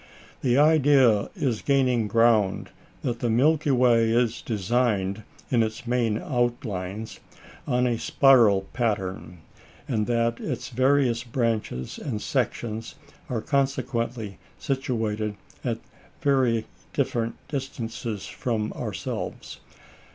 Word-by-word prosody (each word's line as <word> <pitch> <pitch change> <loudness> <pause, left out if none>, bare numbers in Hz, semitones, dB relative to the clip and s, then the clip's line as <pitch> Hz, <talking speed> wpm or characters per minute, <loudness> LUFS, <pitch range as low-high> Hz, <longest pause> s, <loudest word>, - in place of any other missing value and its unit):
The 125 -1 +2
idea 140 -8 +5
is 125 -6 -1
gaining 130 -5 +2
ground 115 -3 +2 0.3
that 120 - -2
the 120 - 0
Milky 145 +6 +3
Way 120 -3 +4
is 120 0 +1
designed, 105 -2 0 0.3
in 120 -3 +4
its 110 +2 -2
main 120 -3 +1
outlines, 110 -5 -2 0.5
on 125 -2 +2
a 120 -2 0
spiral 120 -10 +5
pattern, 95 -7 -2 0.5
and 110 -7 0
that 115 -1 +1
its - - -4
various 130 -1 +2
branches 115 - -2
and 125 -8 -3
sections 115 -3 -2 0.3
are 120 -4 -1
consequently 120 -6 -1 0.2
situated 110 -6 -2 0.3
at 120 -3 -1 0.4
very 130 -5 +2 0.3
different 115 -1 -1
distances 120 -6 -4
from 110 -3 -2
ourselves. - - -5
115 Hz, 105 wpm, -25 LUFS, 110-130 Hz, 0.5 s, idea